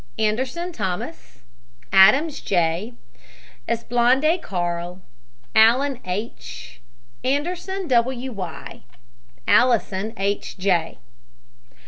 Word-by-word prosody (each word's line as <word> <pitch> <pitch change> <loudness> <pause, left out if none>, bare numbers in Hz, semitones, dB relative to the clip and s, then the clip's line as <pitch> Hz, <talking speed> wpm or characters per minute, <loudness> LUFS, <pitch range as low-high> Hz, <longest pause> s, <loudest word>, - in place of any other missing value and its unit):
ANDERSON, 255 +11 -1
THOMAS. 190 - -5 0.5
ADAMS, 270 +11 +6
J. 175 +5 0 0.7
ASPALANDE, 245 +8 +2
CARL. 175 -1 -3 0.6
ALLEN, 250 +4 +4
H. 195 - -6 0.4
ANDERSON, 355 +7 -2
W. 255 +1 +1
Y. 185 -7 -7 0.7
ALLISON, 220 -4 +2
H. 200 +1 -2
J. 180 -4 0
230 Hz, 70 wpm, -22 LUFS, 190-265 Hz, 0.7 s, ADAMS